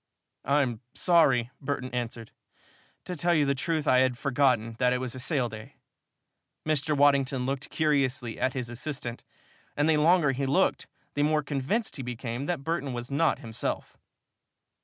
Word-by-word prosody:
"I'm 135 -5 +1
sorry," 135 -9 +3
Burton 135 -2 -3
answered. 115 -2 -4 0.7
"To 180 - -4
tell 170 +2 +2
you 150 -2 +3
the 140 - +2
truth, 155 +2 -2
I 130 - +5
had 130 -1 +2
forgotten 125 -5 +1
that 125 0 +3
it - - +1
was 125 -1 -4
a 130 - -6
sale 130 -1 0
day." 110 -1 -10 0.9
Mr. 150 -1 +1
Waddington 140 -2 +3
looked 135 +2 -3
curiously 135 -6 0
at 130 - +1
his 125 -3 -4
assistant, 120 -1 -5 0.5
and 145 +1 +2
the 160 -1 +4
longer 160 -1 +4
he 135 +1 -2
looked, 140 - +1 0.3
the 145 - -1
more 150 0 +2
convinced 145 - -2
he - - -4
became 125 +2 -4
that 175 -6 -2
Burton 150 -4 -2
was 120 +2 -6
not 160 +4 +2
himself. 110 -1 -3
135 Hz, 160 wpm, -28 LUFS, 125-150 Hz, 0.9 s, I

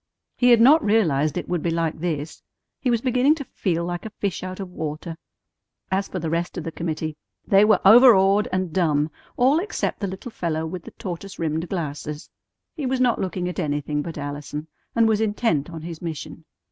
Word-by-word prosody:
He 245 - +3
had 240 -2 +7
not 290 +7 +6
realized 160 -9 +2
it 180 - -4
would 175 -2 -1
be 170 - -1
like 165 -1 -1
this. 160 -3 -3 0.4
He 255 - 0
was 235 -2 +2
beginning 255 +4 +3
to 295 - -6
feel 170 -9 -2
like 175 0 -4
a 220 - -5
fish 200 -3 -3
out 185 +1 -6
of 190 -2 -6
water. 160 0 -5 0.8
As 195 +1 0
for - - -5
the 165 -2 -3
rest 170 +2 -2
of 175 - -3
the 165 - -4
committee, 155 -2 -4 0.3
they 200 -1 +5
were 215 -3 +4
overawed 210 -3 +7
and 185 -3 -1
dumb, 155 -4 +1 0.3
all 265 +5 +4
except 420 +4 -2
the 200 - -2
little 190 +6 -7
fellow 160 -5 -2
with 165 +1 -6
the - - -9
tortoise 195 -2 -6
rimmed 160 +1 -2
glasses. 150 -3 -5 0.4
He 295 -5 -3
was 260 0 0
not 250 -2 +2
looking 180 -1 -2
at 180 - -4
anything 150 -2 -1
but 165 +2 -6
Allison, 145 +1 -5 0.3
and 230 -1 +4
was 220 -1 +2
intent 205 -9 0
on 165 -2 -8
his 165 -1 -7
mission. 160 -1 -6
180 Hz, 200 wpm, -23 LUFS, 160-215 Hz, 0.8 s, had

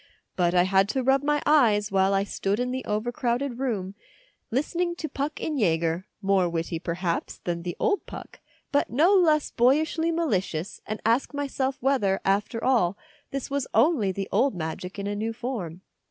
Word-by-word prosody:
But 175 -1 +1
I 175 - +6
had 190 +1 +3
to 260 +4 0
rub 270 +1 +3
my 295 +1 0
eyes 220 -9 +4
while 190 0 +3
I 195 0 +2
stood 200 +1 -2
in 250 0 -1
the 260 0 -3
overcrowded 240 +4 -1
room, 205 -8 -2 0.6
listening 345 +7 -1
to 325 - -4
Puck 290 +1 -4
in 305 -3 -2
Jaeger, 170 -1 +1 0.2
more 190 -2 +3
witty, 165 0 -3
perhaps, 170 0 -3
than 170 -1 -3
the 175 0 -5
old 415 -3 0
Puck, - - -10 0.3
but 285 - +1
no 320 - +4
less 315 -6 +3
boyishly 310 +6 +2
malicious, 200 - -2
and 215 0 -3
ask 235 +6 +1
myself 275 -2 -2
whether, 245 -8 +2
after 205 +4 0
all, 210 -8 +2 0.3
this 275 0 -5
was 280 -2 -1
only 265 - +3
the 195 +1 -4
old 240 +3 +2
magic 175 +3 -5
in 200 - -4
a 205 0 -2
new 220 +2 -2
form. 215 -9 -5
225 Hz, 175 wpm, -26 LUFS, 190-275 Hz, 0.6 s, I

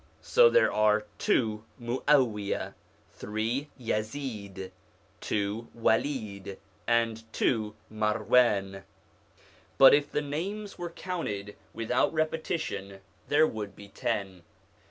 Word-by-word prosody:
So 485 0 +6
there 485 +1 +4
are 105 0 +3
two 110 -3 +1 0.2
Mu'awia, 120 -4 +1 0.4
three 115 +7 -2
Yazid, 105 -5 -4 0.5
two 105 +3 -2
Walid, 110 -5 -1 0.3
and 115 -1 0
two 110 -3 0 0.2
Marwan; 105 -2 +2 1.0
but 135 - +9
if 145 0 +2
the 150 - 0
names 195 +8 -4
were 175 -1 -3
counted 105 - -4 0.2
without 115 +5 +1
repetition 155 - -2 0.3
there 150 +2 +5
would 105 -7 -5
be 100 -1 -12
ten. 95 -2 -3
115 Hz, 95 wpm, -29 LUFS, 105-145 Hz, 1.0 s, but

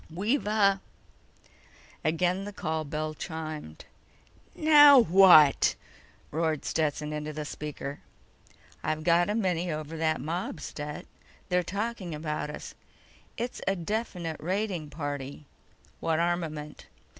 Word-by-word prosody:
We've 205 - -1
a—" 200 -2 +3 1.2
Again 180 +4 +1
the 205 - -6
call 160 -5 -3
bell 155 +1 -3
chimed. 155 - -7 0.7
"NOW 290 -4 +8
WHAT?" 170 -6 +7 0.6
roared 160 -1 -1
Stetson 150 -1 -1
into 150 0 -4
the 150 0 -5
speaker. 145 -1 -6 0.8
"I've 155 0 -2
got 175 +3 +3
a 210 - 0
mini 180 -5 0
over 155 +1 -5
that 160 0 +1
mob, 165 +3 -4
Stet. 150 0 -6 0.4
They're 180 0 +3
talking 200 -1 -4
about 150 -1 -3
us. 150 - -8 0.6
It's 240 +2 -4
a 195 - +2
definite 175 -3 -3
raiding 185 -2 -2
party." 145 -1 -5 0.5
"What 160 -1 0
armament?" 165 -3 -3
165 Hz, 115 wpm, -28 LUFS, 150-190 Hz, 1.2 s, NOW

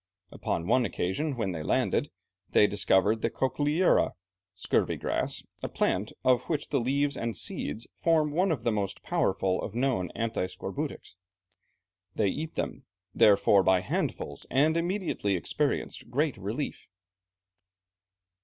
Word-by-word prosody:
Upon 85 - -2
one 120 +6 +3
occasion 130 - -1
when 105 -5 -1
they 80 -3 -4
landed, - - +1 0.4
they - - +5
discovered 100 +2 +2
the - - +1
cochlearia 150 +6 +2 0.4
(scurvy 90 - 0
grass), - - -2 0.2
a - - -3
plant 100 +4 0
of 125 -1 +3
which 150 -3 -1
the 140 - +1
leaves 140 +4 +1
and 115 -4 -3
seeds 110 +8 -3
form 160 -3 +2
one 180 +4 +2
of 140 -8 -2
the 115 - +2
most 100 -3 -3
powerful 95 -1 +1
of 110 - -6
known 120 -8 0
anti 115 -5 -1
scorbutics. 90 - -6 1.0
They 100 - +2
eat 155 +8 -4
them, - - -4 0.3
therefore, 100 -1 +5
by 95 -1 +3
handfuls, 95 - -3
and 150 +4 +3
immediately 170 - 0
experienced 90 +6 -2
great 140 +2 +1
relief. 105 +9 -4
115 Hz, 135 wpm, -28 LUFS, 95-145 Hz, 1.0 s, they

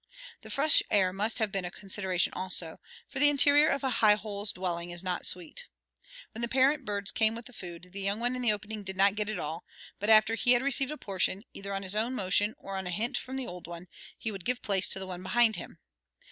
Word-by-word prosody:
The - - -12
fresh 295 +2 +7
air 190 -3 +2
must 210 +4 -1
have 220 -3 0
been 195 -1 -2
a 175 - -4
consideration 190 -2 -2
also, 180 -3 -4 0.3
for 275 - -5
the 290 +1 +6
interior 290 +1 +6
of 275 0 -1
a 265 - +1
high 210 -2 +6
hole's 210 -1 -2
dwelling 175 -2 -4
is 175 +1 -5
not 180 -1 -2
sweet. 470 - -3 0.6
When 225 - -8
the 235 - 0
parent 270 +3 +2
birds 205 -1 -2
came 220 0 +2
with 235 +2 -9
food 175 0 -10
the 200 +1 -7
young 200 +2 -1
one 245 +2 0
in 250 - -4
the 240 -3 +4
opening 210 +1 -4
did 190 -1 -7
not 195 +1 +5
get 210 0 -3
it 215 - -3
all, 160 +3 -5 0.4
but 205 - -2
after 220 0 +6
he 245 +2 +3
had 245 +1 +2
received 275 -1 +1
a 300 - -5
portion, 195 -1 -1
either 200 0 -7
on 195 0 -3
his 190 0 -1
own 225 +4 0
motion 205 +1 +2
or 195 0 -7
on 190 -1 -4
a - - -3
hint 215 +7 -2
from 260 +1 -4
the 265 -1 -2
old 180 -3 -9
one, 170 +1 -9 0.3
he 225 - -4
would 195 -3 -8
give 250 +3 -2
place 195 -2 0
to - - +2
the 190 - -4
one 180 -1 -7
behind 225 +3 +2
him. - - -8
205 Hz, 245 wpm, -29 LUFS, 185-240 Hz, 0.6 s, fresh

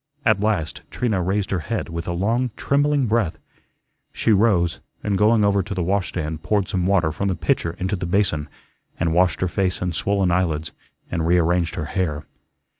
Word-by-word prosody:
At 110 -3 +4
last 100 -7 -1
Trina 110 -7 -1
raised 95 +3 -1
her 95 - +1
head, 115 +6 -3
with 85 0 -5
a - - -1
long, 115 +8 0
trembling 145 -1 +2
breath. 105 -8 0 0.7
She 115 - 0
rose, 100 -5 +3 0.2
and 105 -2 0
going 105 +2 +4
over 100 -1 +3
to 100 +2 -5
the 90 - -1
washstand, 85 -4 -2
poured 100 +2 0
some 90 -1 0
water 90 -5 +2
from 100 +6 -2
the 95 - 0
pitcher 85 +1 0
into 95 +3 -1
the 90 -2 -4
basin, 85 -6 0 0.5
and 80 -1 +1
washed 90 +1 +2
her 95 - +2
face 95 0 -1
and 90 -1 -2
swollen 95 +2 +1
eyelids, 80 -3 0 0.4
and 85 -1 -1
rearranged 85 0 +2
her 75 - -3
hair. 75 -3 -2
95 Hz, 185 wpm, -22 LUFS, 85-105 Hz, 0.7 s, At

